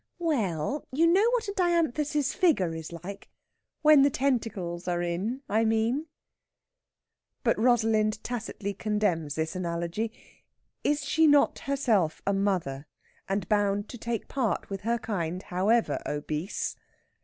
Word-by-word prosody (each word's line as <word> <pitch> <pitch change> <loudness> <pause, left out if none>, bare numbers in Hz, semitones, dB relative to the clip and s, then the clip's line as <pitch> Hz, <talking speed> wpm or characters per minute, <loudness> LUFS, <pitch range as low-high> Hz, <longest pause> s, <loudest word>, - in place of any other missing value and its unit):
We 335 -3 +1
ell, 195 - -1
you 305 +6 +3
know 385 +7 +5
what 485 -3 0
a 400 - -3
dianthus's 310 -6 +1
figure 230 - +2
is 160 0 -7
like? 180 +4 -8 0.5
When 305 -2 +8
the 280 - +5
tentacles 220 -11 -1
are 175 -1 0
in, 200 +10 -2
I 220 +2 +2
mean." 225 +7 +1 1.4
But - - +2
Rosalind 220 -2 +2
tacitly 220 -4 -4
condemns 200 -8 -1
the 160 0 0
analogy. 175 +4 -2 0.7
Is 295 0 +1
she 320 +2 +4
not 290 -1 +4
herself 230 - +1
a 200 - +2
mother, 180 -8 -1 0.4
and 195 -2 -1
bound 205 0 +1
to 245 - -8
take 230 0 -3
part 245 -7 -1
with 195 - -4
her 235 +3 0
kind, 185 -5 -3
however 205 +6 +1
obese? 150 +5 -3
215 Hz, 135 wpm, -28 LUFS, 180-275 Hz, 1.4 s, When